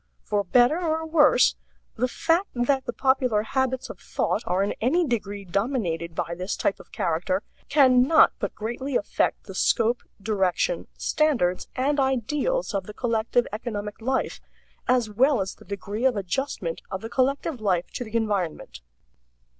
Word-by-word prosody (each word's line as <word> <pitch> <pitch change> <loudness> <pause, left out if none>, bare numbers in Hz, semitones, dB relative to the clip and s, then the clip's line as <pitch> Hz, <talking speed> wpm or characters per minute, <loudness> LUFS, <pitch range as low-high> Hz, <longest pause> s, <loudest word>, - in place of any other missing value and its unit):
For 205 -1 0
better 245 - +4
or 320 -1 -1
worse, 315 -2 +5 0.4
the 250 +3 +1
fact 330 +8 +1
that 260 +2 +1
the - - -2
popular 255 -4 +2
habits 260 +2 -1
of - - -9
thought - - -1
are 185 +2 +2
in 200 - -1
any 330 +10 +2
degree 205 -6 -3
dominated 175 - -2
by 170 +1 -2
this 180 +3 -4
type 195 - 0
of - - -15
character 185 +1 -1 0.3
can 260 -4 +6
not 315 +6 +6
but - - -3
greatly 240 +5 -4
affect - - 0
the - - -9
scope, 235 +1 +2 0.2
direction, 205 - 0
standards, 245 -13 +1
and 280 +3 +1
ideals 275 - 0
of 195 -2 -2
the 210 - -9
collective 235 0 +1
economic 210 -2 -5
life, 260 +3 -1 0.5
as 245 -2 +3
well 250 +5 +3
as 190 0 -2
the - - -18
degree 205 +4 -4
of 260 -3 +4
adjustment 195 -3 -3
of 190 -1 -4
the 225 - -5
collective 270 +1 0
life 180 -4 0
to 245 - -4
the 225 -1 -9
environment. 185 - -2
235 Hz, 160 wpm, -25 LUFS, 200-265 Hz, 0.5 s, can